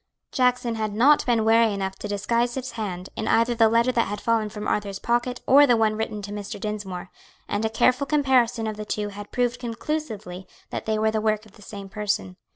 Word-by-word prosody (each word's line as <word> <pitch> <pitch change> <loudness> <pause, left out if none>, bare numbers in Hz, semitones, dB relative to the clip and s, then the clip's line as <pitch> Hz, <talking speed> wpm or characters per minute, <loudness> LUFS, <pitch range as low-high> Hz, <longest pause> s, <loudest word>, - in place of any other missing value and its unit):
Jackson 250 -2 +1
had 215 -2 -3
not 280 +7 +5
been 230 -3 +2
wary 225 0 +5
enough 195 -1 -2
to - - -6
disguise 235 +4 0
his 260 -1 -4
hand 190 -5 -5
in - - -3
either 230 +1 +3
the 225 -1 +4
letter 235 +3 +3
that 235 -2 +1
had 205 +1 -4
fallen 225 -2 +1
from 210 0 -6
Arthur's 200 -2 -1
pocket, 240 +2 -1
or 285 +2 +7
the 240 -2 +4
one 220 -1 +2
written 215 -1 -3
to 200 - -6
Mr. 205 -1 -6
Dinsmore, 195 -4 -5 0.4
and 205 +2 -1
a - - +1
careful 255 +5 +2
comparison 255 -6 +2
of 215 -1 -3
the 215 - -4
two 210 0 -2
had 205 0 -9
proved 245 0 0
conclusively 230 - -5 0.2
that - - -5
they 220 0 +1
were 220 0 +2
the 220 0 -1
work 215 0 0
of 215 - -18
the 210 - -19
same 200 -1 -9
person. 210 -2 -2
220 Hz, 220 wpm, -24 LUFS, 205-240 Hz, 0.4 s, or